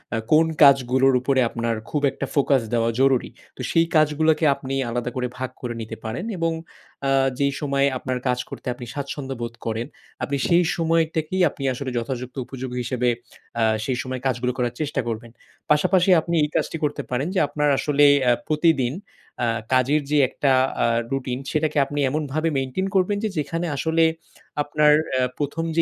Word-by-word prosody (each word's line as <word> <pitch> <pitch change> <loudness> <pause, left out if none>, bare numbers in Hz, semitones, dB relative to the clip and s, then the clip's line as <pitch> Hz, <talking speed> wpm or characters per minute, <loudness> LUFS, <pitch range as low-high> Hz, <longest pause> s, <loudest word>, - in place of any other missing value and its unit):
আ - - 0
কোন 155 +1 +6 0.2
কাজগুলোর 135 -1 +5
উপরে 130 +1 +1
আপনার 115 -1 -2
খুব 150 - -1
একটা - - -4
ফোকাস 140 -2 +3
দেওয়া 115 -1 +2
জরুরি। 135 -2 +3 0.3
তো - - -6
সেই 165 0 +4
কাজগুলোকে 155 +1 +3
আপনি 135 0 -6 0.2
আলাদা 120 +1 -2
করে 125 -1 -1
ভাগ 130 0 -3
করে 120 -2 -3
নিতে 110 - -6
পারেন 115 - -4
এবং 165 0 0 0.5
অ্যা 135 0 +2 0.3
যেই 140 0 +2
সময়ে 140 -1 +2
আপনার 130 0 -3
কাজ 125 0 +1
করতে - - -9
আপনি 120 0 -9
স্বাচ্ছন্দ্য 140 -1 -5
বোধ 115 0 -4
করেন, 115 +2 -2 0.4
আপনি 140 0 -1
সেই 175 +1 +4
সময়টাকেই 165 +1 0
আপনি 140 - -9
আসলে 130 +1 -4
যথাযুক্ত 125 +1 -4
উপযোগী 130 -1 -6
হিসেবে 125 0 0 0.5
অ্যা 115 - +2 0.2
সেই 130 -2 -1
সময় 130 0 -5
কাজগুলো 125 -1 0
করার 120 -2 -1
চেষ্টা 150 - -1
করবেন। 115 0 -5 0.4
পাশাপাশি 180 +5 +3
আপনি 170 +2 -2
এই 150 - 0
কাজটি - - 0
করতে 150 -1 -1
পারেন 130 +4 -1
যে - - +3
আপনার 150 0 0
আসলে 145 0 +3 0.2
অ্যা 125 -1 +4
প্রতিদিন 150 -5 +2 0.5
আ - - +1 0.3
কাজের 130 +4 +3
যে 150 - +3
একটা 140 0 0 0.3
আ - - +4 0.3
রুটিন, 130 -2 -2
সেটাকে 155 -1 0
আপনি 145 +1 -4
এমনভাবে 155 +3 -1
maintain 135 +9 -1
করবেন 190 +2 +2
যে 220 - +1
যেখানে 165 +3 -2
আসলে 160 +3 +2 0.6
আপনার 150 0 +4 0.2
আ - - +2 0.2
১ম 145 +3 -2
যে 165 - +4
140 Hz, 175 wpm, -23 LUFS, 125-155 Hz, 0.6 s, কোন